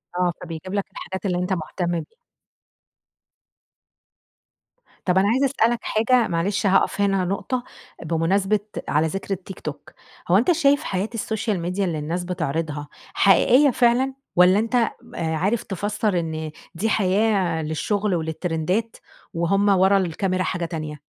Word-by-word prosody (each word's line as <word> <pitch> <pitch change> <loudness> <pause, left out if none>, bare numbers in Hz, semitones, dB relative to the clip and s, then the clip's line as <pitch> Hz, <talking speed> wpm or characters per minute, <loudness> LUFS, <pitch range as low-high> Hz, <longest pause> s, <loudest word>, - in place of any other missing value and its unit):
آ، 180 0 +2
فبيجيب 170 +2 -7
لك 200 -1 0
الحاجات 190 +2 -7
اللي 180 -2 0
أنت 180 +1 -1
مهتم 175 +1 -3
بيها. 175 - -5 2.9
طب 180 0 +2
أنا 195 +2 +4
عايزة 260 +5 +3
اسألك 240 -3 +1
حاجة، 230 +2 +2
معلش 190 +5 -1
هاقف 195 +1 +2
هنا 195 -2 +2
نقطة، 240 +7 -2 0.4
بمناسبة 185 +6 +1 0.3
على 155 +2 +2
ذكر 195 +4 -3
التيك 190 0 -8
توك، 145 -1 -7 0.4
هو 180 - +5
أنت 240 - +3
شايف 285 -4 +3
حياة 190 +3 -2
السوشيال 220 -3 -2
ميديا 180 +4 -1
اللي 165 -4 -2
الناس 165 +4 -3
بتعرضها 155 -4 -3 0.3
حقيقيّة 250 - +5
فعلًا، 250 +2 +2 0.2
والّا 180 +3 +6
أنت 230 +2 -1
آآ 235 -2 +3 0.4
عارف 200 +8 0
تفسّر 205 0 -1
إن 160 -2 -4 0.2
دي 210 +7 0
حياة 195 -4 +2
للشغل، 195 +6 -1
وللترندات، 165 +6 -2 0.4
وهم 195 +5 +2
ورا 195 0 +5
الكاميرا 185 +1 0
حاجة 180 -2 -2
تانية؟ 155 -3 -5
190 Hz, 135 wpm, -23 LUFS, 170-215 Hz, 2.9 s, والّا